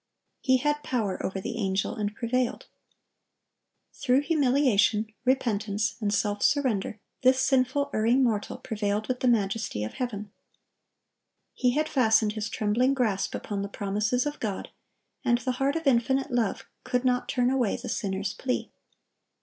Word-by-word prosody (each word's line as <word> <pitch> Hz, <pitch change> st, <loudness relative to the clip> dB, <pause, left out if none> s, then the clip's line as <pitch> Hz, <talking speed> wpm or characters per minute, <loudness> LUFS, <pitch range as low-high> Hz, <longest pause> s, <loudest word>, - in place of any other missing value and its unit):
"He 260 Hz, -1 st, +3 dB
had 295 Hz, +3 st, 0 dB
power 220 Hz, -9 st, -2 dB
over 190 Hz, 0 st, -2 dB
the 235 Hz, +4 st, -5 dB
Angel, 190 Hz, -2 st, 0 dB
and 210 Hz, 0 st, -3 dB
prevailed."(1058) 245 Hz, +1 st, -7 dB
Through 260 Hz, +1 st, +3 dB
humiliation, 250 Hz, -8 st, +2 dB
repentance, 215 Hz, -5 st, +1 dB
and 205 Hz, -1 st, 0 dB
self 205 Hz, 0 st, 0 dB
surrender, 240 Hz, -8 st, +1 dB, 0.2 s
this 260 Hz, 0 st, +4 dB
sinful, 265 Hz, +2 st, +2 dB
erring 235 Hz, +5 st, +3 dB
mortal 215 Hz, -4 st, 0 dB
prevailed 210 Hz, -1 st, -2 dB
with 255 Hz, -1 st, -2 dB
the 255 Hz, -, +1 dB
Majesty 210 Hz, -, 0 dB
of 110 Hz, -, -5 dB
heaven. 210 Hz, -5 st, -4 dB, 1.2 s
He 250 Hz, -1 st, +1 dB
had 305 Hz, +1 st, +1 dB
fastened 220 Hz, -7 st, +3 dB
his 215 Hz, 0 st, -3 dB
trembling 235 Hz, +6 st, +1 dB
grasp 215 Hz, -7 st, 0 dB
upon 200 Hz, -2 st, -4 dB
the 200 Hz, -, -3 dB
promises 210 Hz, +6 st, 0 dB
of 295 Hz, 0 st, -3 dB
God, 205 Hz, -4 st, -3 dB, 0.5 s
and 240 Hz, -2 st, +3 dB
the 255 Hz, +1 st, -2 dB
heart 275 Hz, +2 st, +2 dB
of 325 Hz, 0 st, -3 dB
Infinite 265 Hz, +2 st, +2 dB
Love 235 Hz, -4 st, 0 dB, 0.2 s
could 250 Hz, 0 st, -1 dB
not 250 Hz, -1 st, +1 dB
turn 250 Hz, 0 st, +2 dB
away 250 Hz, -6 st, +1 dB
the 245 Hz, -, -8 dB
sinner's 195 Hz, -2 st, -2 dB
plea. 255 Hz, -2 st, -3 dB
235 Hz, 150 wpm, -27 LUFS, 210-260 Hz, 1.2 s, this